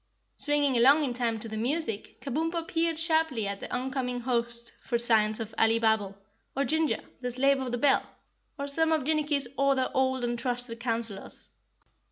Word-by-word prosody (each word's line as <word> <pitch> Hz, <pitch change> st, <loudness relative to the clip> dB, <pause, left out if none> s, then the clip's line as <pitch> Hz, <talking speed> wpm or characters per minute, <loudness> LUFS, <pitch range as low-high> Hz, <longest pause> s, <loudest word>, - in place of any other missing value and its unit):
Swinging 290 Hz, -2 st, +1 dB
along 275 Hz, +6 st, +6 dB
in 260 Hz, -4 st, -1 dB
time 235 Hz, -2 st, -1 dB
to 225 Hz, -, -6 dB
the 220 Hz, 0 st, -5 dB
music, 235 Hz, -2 st, -2 dB
Kabumpo 325 Hz, +4 st, -2 dB
peered 330 Hz, -1 st, 0 dB
sharply 320 Hz, -, +1 dB
at 200 Hz, 0 st, -4 dB
the -, -, -8 dB
oncoming 250 Hz, -1 st, -2 dB
host 235 Hz, -1 st, -2 dB
for 240 Hz, -, 0 dB
signs 220 Hz, -2 st, +2 dB
of 225 Hz, -1 st, -5 dB
Alibabble, 220 Hz, -3 st, +2 dB, 0.4 s
or 275 Hz, -, +2 dB
Ginger, 315 Hz, +3 st, 0 dB, 0.2 s
the 250 Hz, -, -2 dB
slave 275 Hz, +3 st, +3 dB
of 255 Hz, -2 st, -3 dB
the 245 Hz, -, -1 dB
bell, 275 Hz, +2 st, +4 dB, 0.6 s
or 280 Hz, -1 st, -3 dB
some 320 Hz, +3 st, +2 dB
of 315 Hz, -3 st, +2 dB
Jinnicky's 295 Hz, -2 st, +1 dB
other 275 Hz, -2 st, +2 dB
old 260 Hz, -1 st, +1 dB
and 240 Hz, 0 st, -1 dB
trusted 245 Hz, -2 st, -3 dB
counselors. 230 Hz, -4 st, -4 dB
255 Hz, 170 wpm, -28 LUFS, 235-290 Hz, 0.6 s, along